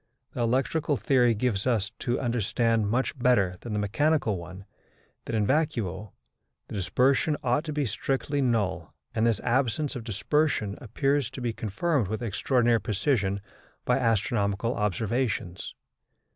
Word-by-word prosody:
The 125 - -3
electrical 135 +5 +1
theory 120 +1 +3
gives 105 -2 0
us 110 -4 +1
to 120 0 -1
understand, 115 -2 +1
much 130 +6 0
better 100 -8 +3
than 115 - -6
the - - 0
mechanical 125 +3 +1
one, 90 +3 -10 0.6
that 115 - -3
in 105 -2 +2
vacuo 110 - -1 0.6
the - - -9
dispersion 125 - +2
ought 125 +4 +1
to 155 - -3
be 145 -1 0
strictly 135 +5 -1
null, 115 -7 0 0.2
and 115 +1 +2
this 110 -3 +1
absence 130 +4 0
of 120 - -5
dispersion 110 0 0
appears 135 +2 0
to 130 - -8
be 120 -2 -2
confirmed 115 - 0
with 110 +4 -3
extraordinary 120 +1 +2
precision 100 -1 0 0.4
by 125 +2 +2
astronomical 115 -1 +1
observations. 105 -2 -2
115 Hz, 140 wpm, -27 LUFS, 105-130 Hz, 0.6 s, theory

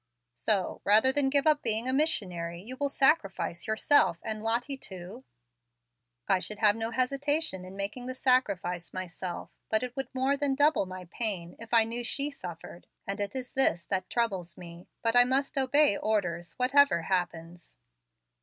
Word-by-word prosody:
So, 195 - 0
rather 220 +6 +5
than 270 0 +1
give 280 0 +2
up 305 -2 +3
being 225 +1 +1
a 260 - +1
missionary, 180 - -1
you 230 +8 -7
will 285 +1 -1
sacrifice 195 - +1
yourself 220 - +3
and 215 -1 -4
Lottie 235 +5 -1
too?" 190 +1 -10 1.0
"I 190 - +3
should 210 +3 -3
have 210 -1 +4
no 225 0 -3
hesitation 275 - 0
in 185 +1 -10
making 210 +6 -4
the 255 - -5
sacrifice 200 -10 0
myself, 185 -1 -6 0.2
but 220 +2 +2
it 250 -1 -5
would 270 - -3
more 265 +2 +1
than 280 -1 -1
double 290 -7 +3
my 185 0 -8
pain 190 -7 -3
if 230 0 -10
I 230 -2 +5
knew 230 +2 -2
she 280 +4 0
suffered. 175 - -10 0.2
And 195 +1 -4
it 205 +4 -3
is 255 -1 -6
this 175 -10 +2
that 185 -1 -1
troubles 190 -8 -2
me. 170 0 -12 0.2
But 230 0 +1
I 245 - +9
must 265 +3 -1
obey 280 +1 +4
my - - -2
orders, 175 -6 -2
whatever 255 - +3
happens." 175 -2 -4
220 Hz, 175 wpm, -29 LUFS, 185-265 Hz, 1.0 s, I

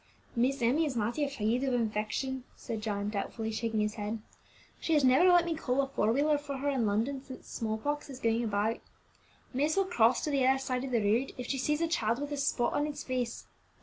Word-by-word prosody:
"Miss 255 +2 +1
Emmie 290 +7 +3
is 270 - -3
mighty 235 +6 0
afraid 250 -3 0
of 265 -2 +1
infection," 235 +4 -1
said 225 -3 -5
John, 205 -1 -2
doubtfully 220 +2 -3
shaking 220 -1 -1
his 210 0 0
head. 215 +1 -3 0.6
"She 325 - 0
has 295 - +4
never 265 +8 +6
let 350 -1 +6
me 335 - 0
call 275 -5 -1
a - - -2
four 225 -5 +1
wheeler 290 +4 +2
for 285 -1 -5
her 285 +2 -1
in 255 -6 +1
London 240 +7 0
since 260 -2 -11
small 220 -2 -2
pox 290 +6 -2
has 265 -2 -9
been 230 -3 +2
going - - 0
about. 215 +1 0 0.7
Miss 295 +6 +1
will 390 - +4
cross 245 -9 +3
to 300 - -1
the 275 -2 +2
other 265 +1 +4
side 255 -1 -2
of 270 - -3
the 230 -3 +2
road 230 +6 +1
if 250 - -5
she 270 +2 -2
sees 300 +4 0
a 335 - +2
child 235 -7 0
with 290 0 -4
a 290 - -2
spot 275 -3 +1
on 295 - +1
its 295 -1 -5
face. 250 -2 -3
255 Hz, 235 wpm, -31 LUFS, 225-285 Hz, 0.7 s, never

